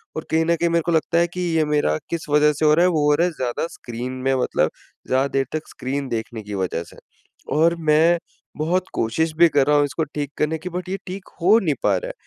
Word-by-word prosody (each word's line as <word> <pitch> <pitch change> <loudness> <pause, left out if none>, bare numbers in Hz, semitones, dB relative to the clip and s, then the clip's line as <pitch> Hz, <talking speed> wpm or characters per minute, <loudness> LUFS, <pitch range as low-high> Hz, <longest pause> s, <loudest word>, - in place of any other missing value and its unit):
और 160 - -4
कहीं 160 0 +2
न 170 0 +2
कहीं 170 +1 0
मेरे 170 0 +2
को 170 - 0
लगता 165 +1 +1
है 170 0 +3
कि 180 - -4 0.2
ये 155 - +3
मेरा 145 - +1
किस 170 -2 -4
वजह 150 +1 +4
से 155 - -1
हो 150 - +6
रहा 170 +3 +4
है? - - +4
वो 150 -3 +1
हो 150 - +5
रहा 170 +4 +2
है - - -3
ज़्यादा 130 +2 -2
स्क्रीन 120 -3 -7
में 135 - +3
मतलब - - +1 0.4
ज़्यादा 130 +2 +2
देर 135 - +2
तक 155 0 -3
स्क्रीन 135 +2 -4
देखने 110 -1 -4
की 105 0 -8
वजह 85 -2 -2
से। - - -16 0.6
और 165 +2 +4
मैं 165 +3 +5 0.4
बहुत 170 +5 0
कोशिश 155 +8 0
भी 170 +1 +7
कर 145 -2 +3
रहा 150 - +4
हूँ 145 - +4
इसको 155 +3 -2
ठीक 145 -1 -5
करने 155 +1 0
की 160 +3 -7
बट 180 0 -5
ये 195 - -2
ठीक 190 +1 -7
हो 200 +6 +6
नहीं 155 -8 0
पा - - +3
रहा - - -5
है - - -6
155 Hz, 260 wpm, -22 LUFS, 140-170 Hz, 0.6 s, भी